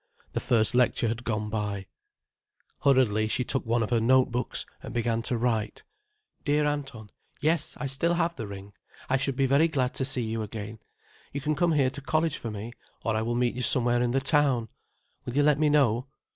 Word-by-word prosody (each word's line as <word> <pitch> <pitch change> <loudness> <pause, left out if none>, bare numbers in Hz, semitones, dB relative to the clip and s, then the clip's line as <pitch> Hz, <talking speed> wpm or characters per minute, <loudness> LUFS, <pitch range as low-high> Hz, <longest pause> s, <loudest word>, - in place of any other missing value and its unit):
The - - -2
first 110 -2 +3
lecture 125 -2 +2
had 115 +1 -4
gone 105 -2 -2
by. 105 -2 -3 0.9
Hurriedly 120 -6 +3
she 125 - -1
took 130 0 -2
one 115 0 +2
of 110 - -4
her 120 - +3
note 130 +2 +4
books 125 +1 -2 0.2
and 120 - -8
began 115 -1 0
to 120 +1 -1
write. 115 -2 -1 0.6
"Dear 150 0 +2
Anton, 135 -8 -4 0.3
Yes, 155 +1 0
I - - -4
still 140 +6 0
have 170 0 0
the 115 - -5
ring. 100 0 -9 0.4
I 135 - +4
should 135 0 -1
be 135 - +2
very 140 +5 +4
glad 130 -5 -1
to - - -2
see 130 -2 -1
you 110 0 -3
again. 110 0 -6 0.5
You 140 - -2
can 150 +3 0
come 165 +3 +2
here 135 -4 +2
to 140 +1 -7
college 155 +2 0
for 115 - -5
me, 110 +2 -6 0.3
or 115 -2 0
I 110 - 0
will 120 +2 -1
meet 120 0 +1
you 125 - -4
somewhere 120 -1 +3
in 125 - +1
the 130 +3 +1
town. 135 -5 +2 0.6
Will 120 - -4
you 145 - +5
let 150 -1 +3
me 155 -1 +3
know? 130 -4 +2
125 Hz, 210 wpm, -27 LUFS, 115-140 Hz, 0.9 s, you